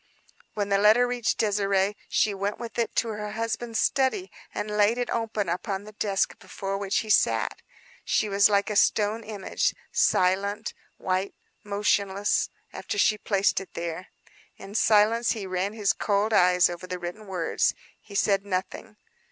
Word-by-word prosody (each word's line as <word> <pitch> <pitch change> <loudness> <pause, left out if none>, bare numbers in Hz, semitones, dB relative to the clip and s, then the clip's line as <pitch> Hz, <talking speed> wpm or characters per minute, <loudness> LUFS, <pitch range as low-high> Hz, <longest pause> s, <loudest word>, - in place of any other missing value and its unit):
When 205 -1 -2
the 200 0 +3
letter 215 +4 +5
reached 245 -2 -1
Désirée 200 -2 +1 0.2
she 210 - +2
went 200 +1 -3
with 235 0 -6
it 230 - -1
to 230 - +1
her 210 -1 -5
husband's 230 +1 -2
study, 275 +9 +1 0.2
and 210 - -4
laid 210 +3 +3
it 245 - -2
open 225 -3 -1
upon 190 +3 -3
the 210 - -11
desk 205 -2 -1
before 195 0 -5
which 200 -1 0
he 220 - -9
sat. - - +2 0.4
She 215 - +1
was 200 0 +4
like 200 +1 +1
a - - -2
stone 210 +2 +2
image: 210 -3 -2 0.2
silent, 200 +4 +1 0.2
white, 185 +1 -2 0.3
motionless 200 -1 0 0.2
after 410 - -5
she 215 - +3
placed 200 -1 +1
it 195 - -13
there. 170 +2 -5 0.5
In 195 - -11
silence 225 +2 +3
he 215 -4 -6
ran 185 +2 -2
his 210 -3 +1
cold 205 +1 0
eyes 180 -2 +5
over 175 +1 -7
the 180 0 -4
written 180 +5 -7
words. 180 -4 0 0.3
He 200 - -13
said 195 -1 +2
nothing. 200 +3 -4
205 Hz, 160 wpm, -26 LUFS, 195-220 Hz, 0.5 s, letter